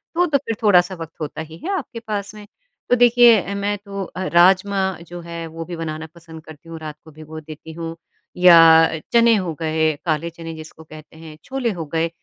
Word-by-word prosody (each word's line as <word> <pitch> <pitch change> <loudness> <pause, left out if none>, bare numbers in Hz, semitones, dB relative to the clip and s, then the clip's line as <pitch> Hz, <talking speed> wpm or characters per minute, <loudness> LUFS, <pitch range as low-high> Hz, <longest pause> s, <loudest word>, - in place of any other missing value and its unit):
तो, 350 +1 +3
तो 305 -5 +2
फिर 230 -5 -5
थोड़ा-सा 185 -3 +4
वक़्त 165 -2 -10
होता 155 +1 -5
ही 160 0 -10
है 355 - -4
आपके 260 -7 -7
पास 210 -3 -5
में। 210 -1 -11 0.4
तो 245 - +5
देखिए 240 -1 +6
अ, 190 +3 -6
मैं 205 +1 -2
तो 200 -1 -7
अ, 185 0 -7
राजमा 190 +3 +4 0.3
जो 175 0 -9
है 170 0 -7
वो 165 +1 -8
भी 175 - -7
बनाना 160 -1 -6
पसंद 160 -1 -13
करती 155 +1 -14
हूँ, 165 -1 -8
रात 155 -1 -8
को 160 - -14
भिगो 155 +1 -10
देती 155 +1 -11
हूँ 165 0 -5 0.4
या 180 -1 +7 0.6
चने 235 -1 +5
हो 185 -5 -2
गए, 160 -1 0
काले 160 +1 -1
चने 165 0 -9
जिसको 155 0 -12
कहते 155 0 -14
हैं, 160 -1 -12
छोले 260 -3 -2
हो - - -5
गए, 165 +1 +1
170 Hz, 210 wpm, -20 LUFS, 160-205 Hz, 0.6 s, या